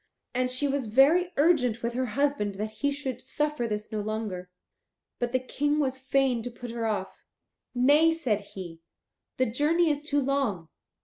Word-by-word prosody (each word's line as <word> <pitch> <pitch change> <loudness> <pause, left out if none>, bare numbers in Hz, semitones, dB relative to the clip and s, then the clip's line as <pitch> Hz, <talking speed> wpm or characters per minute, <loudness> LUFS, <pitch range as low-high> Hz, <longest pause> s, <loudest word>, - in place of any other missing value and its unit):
And 255 0 +1
she 255 +3 0
was 275 -3 -1
very 300 +11 +4
urgent 260 -7 +3
with 235 0 -1
her 255 +1 -1
husband 280 -9 +1
that 215 +2 -3
he 285 +6 -1
should 270 -4 -4
suffer 295 -1 -1
this 210 -1 -4
no 215 - -2
longer. 205 -4 -4 0.7
But 245 -1 -1
the 255 - +2
King 290 +3 -1
was 265 -3 0
fain 265 -2 +1
to 245 - -5
put 240 0 -8
her 230 -1 -2
off. 195 -3 -3 0.6
"Nay," 290 +6 +5
said 260 -11 0
he, 170 -4 -8 0.6
"the 255 - +3
journey 305 +8 +2
is 290 0 -2
too 295 -1 0
long. 260 - -1
255 Hz, 175 wpm, -28 LUFS, 220-285 Hz, 0.7 s, Nay